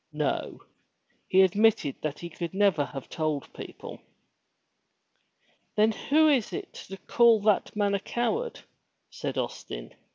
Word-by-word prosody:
No! - - -2 0.6
He 190 0 +5
admitted 200 -5 +3
that 150 -1 -3
he 170 - -7
could 170 +1 -6
never 195 -8 +3
have 135 0 -8
told 155 -4 -3
people. - - -9 1.8
"Then 215 +1 +4
who 310 +8 +3
is 270 -7 +3
to 375 - -8
call 235 -2 +5
that 210 0 +1
man 205 -1 +1
a 200 - +1
coward?" 430 - -2 0.5
said - - -5
Austin. - - -5
205 Hz, 125 wpm, -27 LUFS, 170-235 Hz, 1.8 s, He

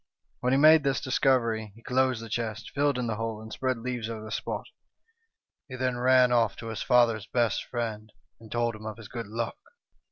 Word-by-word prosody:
When 125 - 0
he 135 - +4
made 155 +2 +7
this 135 -2 0
discovery 115 -5 +1
he 115 - -17
closed 130 -2 +1
the - - -7
chest, 110 -1 -3
filled 145 -1 +1
in 125 - -1
the 110 -2 -2
hole, 115 -1 -3
and 110 0 -9
spread 130 -1 -1
leaves 120 -1 -4
over 110 -1 -6
the 110 - -8
spot. - - -3 1.0
He 130 - -6
then 130 -1 -1
ran 125 0 +4
off 115 -4 +3
to 115 - -7
his 110 - -4
father's 120 -4 +3
best 120 -4 +1
friend, 110 -3 -4 0.3
and 110 -1 -14
told 120 -1 0
him 110 0 -9
of 110 - -6
his 110 -3 -10
good 115 -2 -6
luck. 115 +2 -4
115 Hz, 210 wpm, -28 LUFS, 110-125 Hz, 1.0 s, made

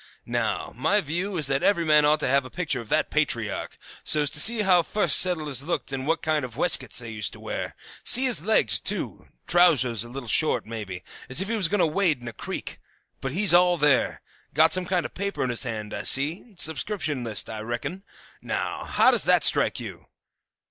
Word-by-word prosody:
Now, - - -3
my 210 - +1
view 180 +4 -4
is 155 - +1
that 135 0 0
every 170 -5 +1
man 150 -1 +4
ought 150 +1 +2
to - - -1
have 140 +2 +2
a 130 - -11
picture 150 -8 -2
of 110 - -14
that - - 0
patriarch, - - -3 0.3
so's 150 -2 +1
to 145 - +2
see 220 +6 +5
how 180 -3 +4
the - - -16
fust 210 - +4
settlers 155 -8 0
looked 160 -1 -4
and 135 +1 -5
what 165 - -1
kind 155 -2 -1
of 125 -2 -8
weskets 140 -8 +2
they 120 -2 -5
used 105 -1 -3
to - - -12
wear. - - -6 0.3
See 255 +2 +5
his 245 - +3
legs, 220 +6 +2
too! - - -3 0.2
Trousers 130 - +3
a 120 - -11
little 130 0 -8
short, 155 +7 0
maybe, 105 -5 -8 0.3
as 125 - 0
if 195 +2 -3
he 230 - -1
was 200 -6 +1
going 200 +2 -1
to - - +4
wade 160 -3 0
in 120 - -12
a 115 - -7
creek; - - -7 0.4
but 135 - -5
he's 195 0 +4
all 175 0 +4
there. 145 -4 +1 0.3
Got 160 +2 +4
some 185 -1 +1
kind 180 -2 -1
of - - -6
a - - -42
paper 200 -4 -4
in 125 - -2
his 120 +3 -1
hand, 110 -3 -6
I - - -4
see. 165 - +3
Subscription 160 - -2
list, 110 -4 -1
I 110 - -7
reckon. 120 - -6 0.4
Now, - - -4
how - - +3
does - - +1
that - - +3
strike - - +4
you? - - -10
150 Hz, 220 wpm, -24 LUFS, 125-180 Hz, 0.4 s, see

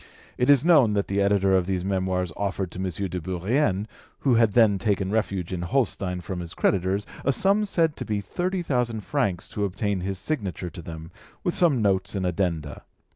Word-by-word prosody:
It 125 - 0
is 140 0 +5
known 145 -11 +5
that 100 -1 0
the 100 +1 +1
editor 100 -1 +3
of 90 -1 +1
these 95 -2 -1
Memoirs 95 -3 -1
offered 95 -3 -2
to - - -8
M. 95 0 -1 0.2
de 90 0 -4
Bourrienne, 95 - 0 0.4
who 135 - +3
had 115 -3 +4
then 110 -5 +4
taken 100 -2 0
refuge 100 -5 -1
in 90 - -3
Holstein 90 -3 -1
from 90 +1 -5
his 85 -1 -7
creditors, 95 +1 +1 0.2
a 140 - +3
sum 200 +8 +3
said 165 -6 +1
to - - -3
be 105 -2 -1
thirty 180 - -2
thousand 125 -7 -1
francs 100 - -1
to 105 - -3
obtain 100 0 -1
his 95 +1 -3
signature 95 - -3
to 90 - -9
them, 80 0 -9 0.3
with 175 - 0
some 150 -11 +3
notes 100 0 +1
and 95 -2 -1
addenda. 85 -4 -2
100 Hz, 195 wpm, -25 LUFS, 90-120 Hz, 0.4 s, is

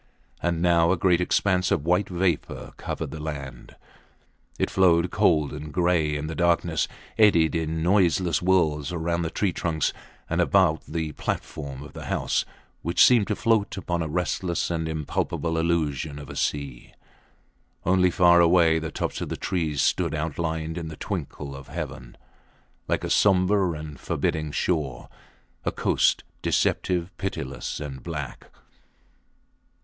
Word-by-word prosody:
And 85 -1 0
now 85 -1 +4
a 95 - +2
great 90 0 +3
expanse 90 0 +2
of 75 - 0
white 90 +3 +2
vapour 90 -3 -2
covered - - -5
the 80 - -7
land: 70 -4 -7 0.8
it - - 0
flowed 90 -2 +3
cold 80 -9 +2
and 75 +1 -7
gray 85 -3 +1
in 75 +1 -3
the 80 - -4
darkness, 85 -1 +1 0.3
eddied 85 -7 +5
in 80 -1 -1
noiseless 90 -3 +3
whirls 85 -5 +1
round 85 0 -1
the 80 - -2
tree 95 0 -1
trunks 80 -3 -1 0.3
and 85 +1 +1
about 90 -4 +3
the 80 -1 -3
platform 70 -2 -5
of 75 - -12
the - - -8
house, - - 0 0.4
which 85 +2 +5
seemed 120 -5 +4
to 105 - 0
float 110 -3 +1
upon 85 -3 -2
a 80 - -1
restless 90 +2 -1
and 80 -1 -2
impalpable 80 +1 -2
illusion 80 -3 0
of 70 -2 -8
a - - -9
sea. 70 -4 -3 0.9
Only 90 0 +4
far 85 0 +5
away 85 -1 +5
the 80 0 -4
tops - - -3
of - - -3
the - - -4
trees 80 -7 -1
stood 85 -4 +1
outlined 80 +1 -2
on 80 - -5
the 80 - -8
twinkle 70 -6 -5
of 70 0 -10
heaven, 65 -5 -7 0.7
like - - 0
a - - -3
sombre 95 -1 +3
and 75 -3 -8
forbidding 75 -1 -1
shore 75 -7 -2 0.5
a - - 0
coast - - +2 0.2
deceptive, 90 0 0
pitiless 70 -8 -4
and 70 -3 -6
black. 75 -6 -6
85 Hz, 150 wpm, -25 LUFS, 75-90 Hz, 0.9 s, eddied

